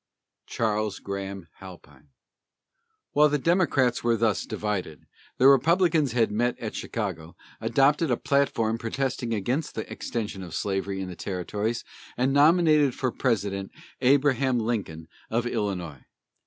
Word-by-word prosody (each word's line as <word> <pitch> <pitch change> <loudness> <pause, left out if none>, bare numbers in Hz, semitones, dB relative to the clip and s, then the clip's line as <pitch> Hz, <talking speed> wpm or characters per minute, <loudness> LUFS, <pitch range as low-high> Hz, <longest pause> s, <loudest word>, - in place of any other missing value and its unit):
CHARLES 110 -2 -1
GRAHAM 100 -2 -6
HALPINE. 95 +8 -13 1.0
While 150 +1 +5
the 150 - +1
Democrats 145 -6 +2
were 115 -1 +2
thus 110 -2 0
divided, 95 -8 -4 0.3
the 130 - +6
Republicans 155 0 +4
had 115 -3 +2
met 120 +3 0
at - - -5
Chicago, 80 +1 -5 0.2
adopted 135 +7 +2
a 120 - +2
platform 115 -5 +1
protesting 125 0 -2
against 125 +8 -2
the 110 - -4
extension 105 -4 -4
of 90 -3 -7
slavery 95 -1 -2
in 95 - -4
the 90 - -7
territories, 100 +6 -3 0.3
and 130 +2 +1
nominated 150 -2 +4
for 130 -2 -1
President 100 -4 -1 0.3
Abraham 135 -1 +3
Lincoln, 105 -9 -3 0.2
of 115 +2 0
Illinois. 95 - -3
115 Hz, 130 wpm, -26 LUFS, 100-135 Hz, 1.0 s, the